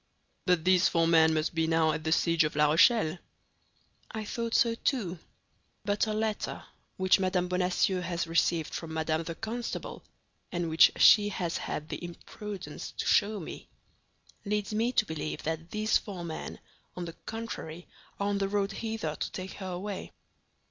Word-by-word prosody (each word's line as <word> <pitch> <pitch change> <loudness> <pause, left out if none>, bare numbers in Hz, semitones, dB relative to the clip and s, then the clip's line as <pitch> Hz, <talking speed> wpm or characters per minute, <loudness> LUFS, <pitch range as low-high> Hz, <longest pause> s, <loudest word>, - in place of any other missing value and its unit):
"But 180 -2 +3
these 185 -1 +5
four 165 -1 +2
men 160 -1 +5
must 155 +2 0
be 160 -1 +1
now 160 -1 +3
at 155 0 -3
the 160 - -1
siege 165 0 +3
of 155 - -2
La 150 0 +4
Rochelle?" 175 -1 +4 0.9
"I 220 -1 -5
thought 230 +2 -2
so, 230 -1 +4
too; 215 - -1 0.7
but 205 +2 +1
a 215 - -1
letter 215 -1 -2 0.3
which 185 0 +4
Madame 185 -1 +1
Bonacieux 180 +1 +1
has 170 -1 -2
received 165 -1 +1
from 160 -1 -5
Madame 160 0 0
the 165 - -4
Constable, 230 +4 -5 0.5
and 175 -2 -2
which 160 - +7
she 205 -1 +7
has 175 -4 -2
had 150 - -4
the - - -5
imprudence 180 -1 -7
to - - -4
show 210 0 +3
me, 165 - -8 0.7
leads 210 0 -2
me 225 +3 +1
to 220 - +2
believe 155 -4 -4
that 160 +1 -3
these 215 +1 +2
four 185 -5 -7
men, 160 -1 -6 0.4
on 180 - -4
the 165 - -7
contrary, 195 -7 -6 0.3
are 200 0 0
on 200 -1 0
the 195 - +1
road 200 0 0
hither 220 -7 -3
to - - -4
take 185 0 -6
her 190 - -7
away." 185 +2 -5
180 Hz, 170 wpm, -29 LUFS, 165-210 Hz, 0.9 s, which